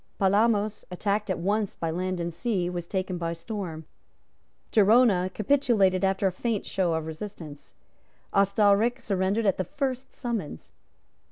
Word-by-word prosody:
Palamos, 210 +1 +2
attacked 200 +3 -1
at 185 - 0
once 205 +3 -1
by 165 -1 -3
land 185 +2 -2
and 170 0 -3
sea, 180 -1 -1
was 175 -1 -5
taken 185 -2 -2
by 170 -1 -2
storm. 165 -3 -6 0.9
Gerona 210 -3 +4
capitulated 215 -6 +2
after 195 +1 +1
a 190 - +3
faint 215 +3 -2
show 180 -4 0
of 160 -1 -2
resistance. 160 -3 -9 0.6
Ostalric 205 +4 +3
surrendered 200 0 0
at 195 -2 +2
the 185 - 0
first 270 0 -4
summons. 225 - -5
195 Hz, 140 wpm, -27 LUFS, 180-215 Hz, 0.9 s, Gerona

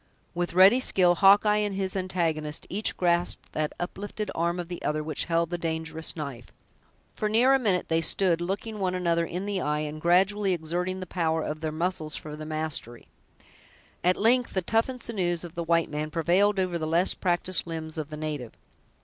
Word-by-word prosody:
With 175 0 -3
ready 195 +7 +7
skill, 185 -8 +4
Hawkeye 205 +3 +5
and 205 -2 -1
his 190 -1 -2
antagonist 165 -5 -1
each 210 +4 -1
grasped 175 -1 0
that 155 -1 -2
uplifted 205 +3 -5
arm 170 +2 -1
of 175 - -4
the 175 0 -7
other 150 0 -1
which 155 0 -2
held 170 0 0
the 175 - -2
dangerous 160 -1 -2
knife. 140 -7 -6 0.7
For 215 - -2
near 240 +5 +4
a 270 - +4
minute 200 -7 0
they 165 0 +1
stood 175 -1 +2
looking 205 +4 -4
one 185 -2 0
another 170 -2 +1
in 180 +3 -4
the 200 -2 -2
eye, 150 0 0
and 155 0 -5
gradually 190 +3 +3
exerting 175 +3 -3
the - - -4
power 160 -3 -1
of 155 +1 -4
their 155 -1 -2
muscles 160 -1 -2
for 150 -1 -7
the 155 0 -8
mastery. 155 -7 -3 1.0
At 180 +1 +3
length, 240 +2 +2
the 190 - 0
toughened 230 +5 0
sinews 180 -7 -1
of 170 -2 -8
the 170 - -3
white 165 0 +2
man 150 +1 -3
prevailed 180 +5 +2
over 180 -2 -1
the 155 - -2
less 170 +3 +2
practiced 175 0 0
limbs 160 -1 -5
of 155 -1 -5
the 155 - -7
native. 150 -6 -5
175 Hz, 190 wpm, -27 LUFS, 160-190 Hz, 1.0 s, ready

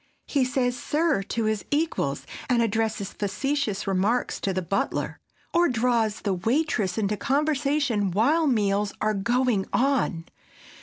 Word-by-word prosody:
He 280 -3 +1
says 250 -1 0
"sir," 300 -1 +1
to 225 +3 -3
his 215 -1 0
equals, 315 +3 -1 0.2
and 240 -2 +3
addresses 220 -2 -1
facetious 230 0 -2
remarks 200 +5 0
to 195 - -1
the 185 0 -2
butler, 195 +4 -2 0.3
or 345 0 +4
draws 230 -3 +1
the 200 - 0
waitress 220 - 0
into 210 -1 0
conversation 280 -5 +1
while 290 - +2
meals 205 -4 +1
are 215 0 +1
going 235 0 +1
on. 245 -11 +1
230 Hz, 135 wpm, -25 LUFS, 200-275 Hz, 0.3 s, or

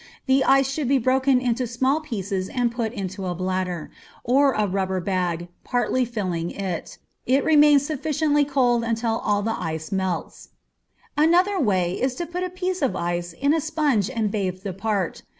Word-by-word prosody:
The 265 0 +3
ice 270 0 +4
should 275 0 -2
be 275 +2 +4
broken 260 +1 +3
into 250 0 -1
small 260 +5 +1
pieces 195 - -3
and 245 -2 0
put 230 -2 -2
into 190 -4 -5
a 175 - -2
bladder, 185 -2 -3 0.3
or 275 +4 +4
rubber 190 -2 0
bag, 175 -2 -1 0.2
partly 250 +1 0
filling 185 -8 -3
it. 185 -4 -5 0.3
It 265 +3 +3
remains 295 -2 +5
sufficiently 295 0 +1
cold 250 -4 +2
until 230 0 -1
all 205 -1 +1
the 225 +1 -2
ice 160 -1 -4
is - - -25
melted. 190 -3 -3 0.7
Another 355 +6 +3
way 185 - +1
is 260 0 0
to 345 - -3
put 345 +2 -5
a 365 - -2
piece 365 0 -3
of 270 - +1
ice 175 0 -2
in 280 - +1
a 325 - +1
sponge 295 - +1
and 225 -5 -1
bathe 185 -3 -2
the 195 -3 -4
part. 195 -2 -2
235 Hz, 175 wpm, -23 LUFS, 190-275 Hz, 0.7 s, remains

